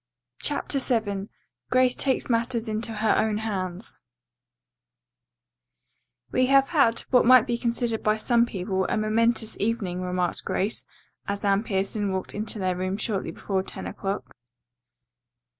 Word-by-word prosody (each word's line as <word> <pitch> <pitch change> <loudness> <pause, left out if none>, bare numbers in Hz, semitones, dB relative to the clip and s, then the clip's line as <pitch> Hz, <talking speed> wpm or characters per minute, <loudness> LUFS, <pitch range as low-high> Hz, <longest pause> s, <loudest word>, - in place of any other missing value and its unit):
CHAPTER 285 -1 0
VII 215 -6 -1 0.4
GRACE 255 -1 +4
TAKES 265 -2 0
MATTERS 235 -1 0
INTO 220 +1 -2
HER 215 0 +1
OWN 215 -1 +1
HANDS 190 -3 -4 2.3
"We 255 0 +2
have 275 0 +4
had, 275 -8 +3
what 250 - +6
might 255 -1 +7
be 240 - -1
considered 235 -1 0
by 215 0 +2
some 235 +1 +2
people, 190 -1 -2
a - - 0
momentous 220 +1 +1
evening," 200 -5 -1
remarked 180 -1 -2
Grace 205 +4 -2 0.4
as 200 0 -3
Anne 200 0 +3
Pierson 200 -1 -1
walked 190 0 -3
into 215 +1 -3
their 185 -2 -1
room 185 +2 -2
shortly 210 -5 -2
before 190 +3 -2
ten - - -7
o'clock. 195 +1 -5
215 Hz, 135 wpm, -25 LUFS, 195-235 Hz, 2.3 s, might